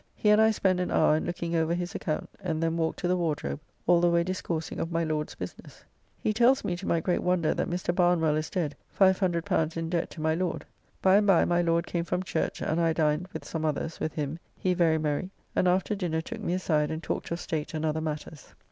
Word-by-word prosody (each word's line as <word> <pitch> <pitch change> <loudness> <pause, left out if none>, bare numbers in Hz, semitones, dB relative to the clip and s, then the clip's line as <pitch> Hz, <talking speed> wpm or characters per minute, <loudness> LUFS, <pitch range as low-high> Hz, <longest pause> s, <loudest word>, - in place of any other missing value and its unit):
He 210 - +3
and 210 +1 +6
I 220 - +6
spend 190 -4 +1
an 180 - -1
hour 155 -1 +4
in 155 - -1
looking 170 0 -3
over 165 +1 +1
his 175 0 -4
account, 155 - -3
and 165 -4 -2
then 165 0 +1
walked 160 -1 -1
to 175 - 0
the 180 - +2
Wardrobe, 155 -4 -2 0.3
all 175 0 +5
the 175 - +4
way 170 0 +3
discoursing 170 -3 -3
of 165 - -2
my 165 0 +1
Lord's 155 -1 -2
business. 90 - -9 0.4
He 215 - 0
tells 245 +4 +4
me 185 -4 -1
to 190 - -7
my 170 - +2
great 175 +2 0
wonder 180 -3 +2
that - - -2
Mr. 175 0 -1
Barnwell 175 -4 +3
is 155 +1 -2
dead 160 -6 -2 0.2
L500 175 -4 +2
in 165 0 -3
debt 170 -2 0
to - - -11
my 160 0 +2
Lord. 175 +1 -2 0.4
By 190 +1 +6
and 205 0 +2
by 190 -4 +5
my 175 0 +2
Lord 170 0 +1
came 170 -1 -2
from 180 +2 -2
church, 165 - -2
and 160 +2 0
I 165 -1 +3
dined, 155 +2 +1
with - - -7
some 160 -1 -4
others, 155 +1 -2
with 155 - -2
him, 150 +1 -3 0.2
he 185 - +1
very 170 -3 +3
merry, 155 +3 -1 0.3
and 185 - +3
after 185 +3 +2
dinner 175 -5 -1
took 225 +6 -7
me 180 - -1
aside 155 -5 +1
and 160 +1 -4
talked - - -3
of 170 - -3
state 160 -3 -3
and 155 0 -1
other 160 0 0
matters. 155 -1 -6
170 Hz, 240 wpm, -28 LUFS, 160-180 Hz, 0.4 s, and